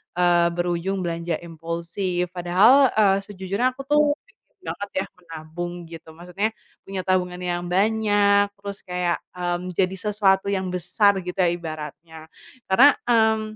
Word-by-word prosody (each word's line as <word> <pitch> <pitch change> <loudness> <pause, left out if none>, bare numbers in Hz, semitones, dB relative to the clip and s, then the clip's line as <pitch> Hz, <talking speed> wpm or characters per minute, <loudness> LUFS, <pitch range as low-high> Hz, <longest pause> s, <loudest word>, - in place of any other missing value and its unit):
eee, 175 -1 +4
berujung 175 +2 -1
belanja 170 -1 -2
impulsif. 170 +2 -3
Padahal, 205 +10 +5
eee, 200 -3 +3
sejujurnya 200 +5 -2
aku 275 - -7
tuh 295 0 +4 0.2
pengen - - -33
banget 200 0 -6
ya 190 - -2
menabung 170 0 -7
gitu, 165 -1 -11
maksudnya 180 +6 -3 0.3
punya 195 -1 -5
tabungan 180 -1 0
yang 175 -1 -2
banyak 205 0 +3
terus 200 0 -8
kayak, 180 -1 -1 0.2
mmm, 180 0 -3
jadi 190 +1 +1
sesuatu 200 -1 +1
yang 190 -1 -1
besar, 180 +3 +2
gitu 180 +1 -6
ya 180 - +4
ibaratnya. 160 -1 -7 0.4
Karena, 250 +10 +7 0.2
mmm, 220 -2 +2
185 Hz, 135 wpm, -23 LUFS, 175-205 Hz, 0.4 s, Karena